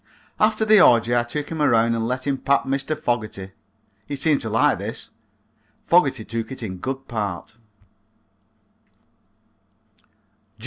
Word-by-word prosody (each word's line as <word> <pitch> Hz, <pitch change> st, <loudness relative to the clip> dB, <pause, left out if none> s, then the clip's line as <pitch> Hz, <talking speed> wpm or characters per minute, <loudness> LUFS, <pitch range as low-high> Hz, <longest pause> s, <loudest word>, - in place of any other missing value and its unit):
After 215 Hz, 0 st, +2 dB
the 215 Hz, -2 st, +6 dB
orgy 120 Hz, -3 st, +4 dB
I 120 Hz, -, +3 dB
took 145 Hz, +5 st, -5 dB
him 160 Hz, -2 st, -4 dB
around 115 Hz, -4 st, +3 dB
and 115 Hz, 0 st, -2 dB
let 130 Hz, +1 st, -3 dB
him 140 Hz, -2 st, -1 dB
pat 140 Hz, +1 st, +1 dB
Mr. 140 Hz, +3 st, -3 dB
Fogerty. 110 Hz, -5 st, -3 dB, 0.6 s
He 145 Hz, -, -4 dB
seemed 145 Hz, +1 st, +1 dB
to 110 Hz, -, -4 dB
like 115 Hz, +2 st, +2 dB
this. -, -, -7 dB, 0.7 s
Fogerty 135 Hz, -10 st, +2 dB
took 115 Hz, +2 st, -5 dB
it 130 Hz, -2 st, -7 dB
in 95 Hz, -4 st, -5 dB
good 135 Hz, +5 st, -5 dB
part. 105 Hz, -3 st, -5 dB
125 Hz, 135 wpm, -22 LUFS, 115-145 Hz, 0.7 s, the